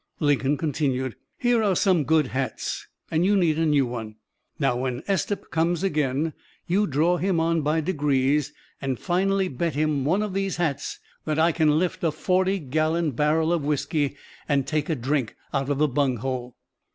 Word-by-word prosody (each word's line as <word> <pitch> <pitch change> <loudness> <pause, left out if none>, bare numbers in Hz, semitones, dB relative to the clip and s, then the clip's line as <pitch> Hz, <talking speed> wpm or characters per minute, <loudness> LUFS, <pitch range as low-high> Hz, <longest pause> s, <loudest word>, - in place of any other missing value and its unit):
Lincoln 145 -1 +2
continued: 130 -6 -1 0.2
"Here 240 -2 +2
are 200 -3 +2
some 175 -5 +3
good 155 -2 +3
hats, 130 +1 -3 0.2
and 160 +1 +2
you 200 +2 +3
need 165 -4 +2
a 165 - +2
new 145 -3 +3
one. 115 -3 -6 0.4
Now, 135 -4 +1
when 125 +2 -3
Estep 200 +1 -1
comes 165 +2 +1
again, 150 -3 0 0.3
you 200 +4 +2
draw 165 +5 +2
him 185 -1 +1
on 165 0 +1
by 155 +2 +1
degrees, 145 -4 +1 0.3
and 135 -2 -1
finally 190 +3 +1
bet 160 +1 -2
him 150 -2 +1
one 180 +9 +2
of 210 -3 -4
these 195 0 -1
hats 150 -5 -2 0.3
that 155 -1 -1
I 165 +2 +4
can 155 -2 +3
lift 175 +1 -1
a 165 - +2
forty 185 +5 +1
gallon 155 +1 0
barrel 155 +5 +2
of 165 -4 0
whisky 145 0 0 0.3
and 140 -2 +2
take 155 0 -1
a 160 - +1
drink 130 -1 -1 0.2
out 135 -1 0
of 145 - +1
the 150 +1 +3
bunghole." 130 -2 -1
155 Hz, 175 wpm, -25 LUFS, 135-170 Hz, 0.4 s, I